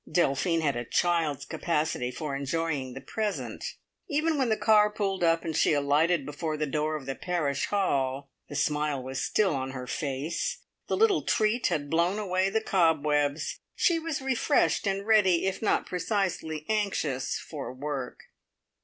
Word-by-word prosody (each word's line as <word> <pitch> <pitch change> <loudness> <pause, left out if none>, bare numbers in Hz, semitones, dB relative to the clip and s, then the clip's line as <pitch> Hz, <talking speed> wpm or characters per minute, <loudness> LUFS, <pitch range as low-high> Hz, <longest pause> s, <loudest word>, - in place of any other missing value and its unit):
Delphine 165 +1 +2
had 140 -4 +1
a 120 - -2
child's 165 +1 0
capacity 155 -5 -1
for 140 +2 -4
enjoying 140 -2 -2
the 135 - -7
present; 215 -2 -3 0.5
even 310 +2 +1
when 265 -4 +1
the 220 - +2
car 210 -1 +5
pulled 195 -3 -2
up 165 0 +3
and 160 -2 -2
she - - +3
alighted 145 +2 +2
before 155 +1 -3
the 150 - 0
door 155 +2 -1
of 145 -3 -6
the 135 - -2
"Parish 155 -4 -1
Hall," 140 -8 0 0.2
the 145 - -7
smile 150 -1 0
was 130 +1 -3
still 200 -6 +2
on 130 0 -3
her 125 -1 -5
face. 140 +4 -3 0.2
The - - 0
little 440 -4 +4
treat 220 +3 +1
had 145 -2 -2
blown 170 +4 +2
away 190 -2 +1
the 220 +3 0
cobwebs; 150 -6 +1 0.2
she 340 -2 +3
was 315 -4 -3
refreshed 265 -3 +2
and 195 0 -1
ready, 195 -6 +4
if 190 - -1
not 220 - +1
precisely 180 -5 -2
anxious, 195 -11 -1
for 145 -5 -7
work. 135 -1 -5
160 Hz, 160 wpm, -28 LUFS, 140-200 Hz, 0.5 s, car